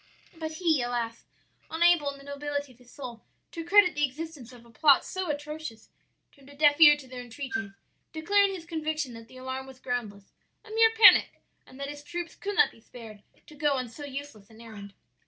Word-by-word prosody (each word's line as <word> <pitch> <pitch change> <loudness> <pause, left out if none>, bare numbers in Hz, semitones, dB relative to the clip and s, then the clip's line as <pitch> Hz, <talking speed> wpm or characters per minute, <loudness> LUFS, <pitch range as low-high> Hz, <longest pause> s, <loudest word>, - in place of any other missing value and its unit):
"But 320 -1 -5
he, 315 -4 +1
alas! 235 -1 -3 0.4
unable, 330 -2 +3
in 280 - -8
the 275 - -15
nobility 285 0 -4
of 250 - -22
his 250 0 -19
soul, 245 -5 -9 0.3
to 330 - -6
credit 360 +1 +5
the 295 - -1
existence 290 -2 -5
of 240 -2 -15
a 235 - -18
plot 280 +4 +4
so 375 -2 -4
atrocious, 295 -5 -6 0.4
turned 275 -1 -20
a 285 - -14
deaf 295 +1 +3
ear 295 -2 +9
to 275 -3 -13
their 250 -1 -8
entreaties, 245 -3 -5 0.4
declaring 390 +5 +2
his 340 -3 -9
conviction 310 -5 -3
that 230 0 -11
the 255 - -15
alarm 260 +1 -6
was 265 -1 -13
groundless 215 -6 -5 0.3
a 435 - -13
mere 450 +1 +5
panic 440 -2 +6 0.2
and 260 - -15
that 280 - -4
his 290 0 -10
troops 345 +3 -6
could 410 0 -5
not 440 0 +4
be 225 - -20
spared 220 -3 -12 0.2
to - - -15
go 295 -1 +1
on 255 -3 -3
so 290 +6 -10
useless 275 -7 -8
an 220 0 -17
errand. 205 -3 -11
285 Hz, 205 wpm, -28 LUFS, 245-315 Hz, 0.4 s, ear